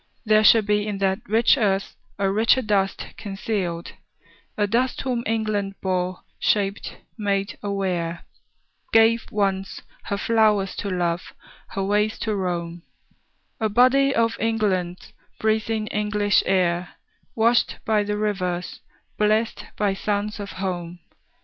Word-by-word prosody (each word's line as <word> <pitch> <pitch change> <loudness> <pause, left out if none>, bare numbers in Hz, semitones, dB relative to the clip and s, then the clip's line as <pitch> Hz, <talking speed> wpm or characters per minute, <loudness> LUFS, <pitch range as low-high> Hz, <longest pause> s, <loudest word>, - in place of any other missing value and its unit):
There 215 0 +4
shall 225 0 +7
be 210 0 0
In 205 -2 -2
that 195 -1 +1
rich 225 +6 +4
earth 195 -3 0 0.2
a 200 -1 +1
richer 230 +5 +3
dust 195 -3 0
concealed; 195 -4 -3 0.7
A 205 - +2
dust 240 +5 0
whom 250 -3 -1
England 215 -3 -1
bore, 185 -1 -2 0.2
shaped, 200 -1 0 0.2
made 200 -1 -1
aware, 185 -4 -2 0.7
Gave, 225 +1 +4
once, 195 -2 -1 0.2
her 200 - -2
flowers 210 -3 +2
to 200 - -3
love, 175 -1 -2 0.3
her 195 - -3
ways 210 +2 +1
to 215 -2 -1
roam, 175 -3 -3 0.8
A 220 -2 +1
body 255 +5 +4
of 230 0 +2
England's, 195 -6 -1 0.3
breathing 220 0 0
English 210 -1 +2
air, 180 -2 +1 0.4
Washed 230 +1 +3
by 215 -1 +2
the 210 0 -2
rivers, 185 -4 -2 0.4
blest 215 +2 +1
by 205 -2 +1
suns 205 +1 -2
of 200 -1 -6
home. 180 -2 -4
205 Hz, 125 wpm, -23 LUFS, 190-220 Hz, 0.8 s, shall